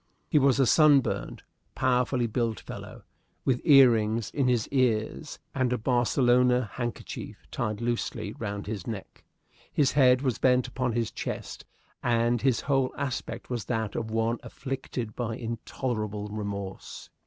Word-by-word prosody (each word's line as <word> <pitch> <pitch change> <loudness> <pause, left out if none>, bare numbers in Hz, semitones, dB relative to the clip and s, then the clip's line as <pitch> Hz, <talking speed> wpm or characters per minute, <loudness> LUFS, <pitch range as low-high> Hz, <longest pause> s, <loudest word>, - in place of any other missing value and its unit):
He 150 - +3
was 135 -1 +3
a 135 - +5
sunburned, 145 +1 +3 0.3
powerfully 125 -1 +1
built 115 -1 -1
fellow, - - -9 0.4
with 125 -2 +1
ear 135 -6 +8
rings 110 0 0
in 140 -3 +1
his 120 -4 +1
ears 130 +2 0 0.2
and 130 -3 0
a 125 - +1
Barcelona 125 -1 +2
handkerchief 120 -2 -6
tied 105 0 -2
loosely 115 -3 -2
round 100 -2 -4
his 105 -3 -5
neck. 105 -5 -7 0.5
His 140 -3 +2
head 130 -2 +4
was 130 -5 0
bent 125 -1 +3
upon 125 -1 -2
his 115 -1 -1
chest, - - -6 0.4
and 120 0 +2
his 130 -3 +2
whole 135 -2 +1
aspect 135 -2 -4
was 120 -5 -2
that 110 -2 -2
of 110 -1 -3
one 115 +1 0
afflicted 130 -4 -5
by 115 -2 -2
intolerable 110 -2 -4
remorse. 100 -2 -6
120 Hz, 140 wpm, -28 LUFS, 110-130 Hz, 0.5 s, ear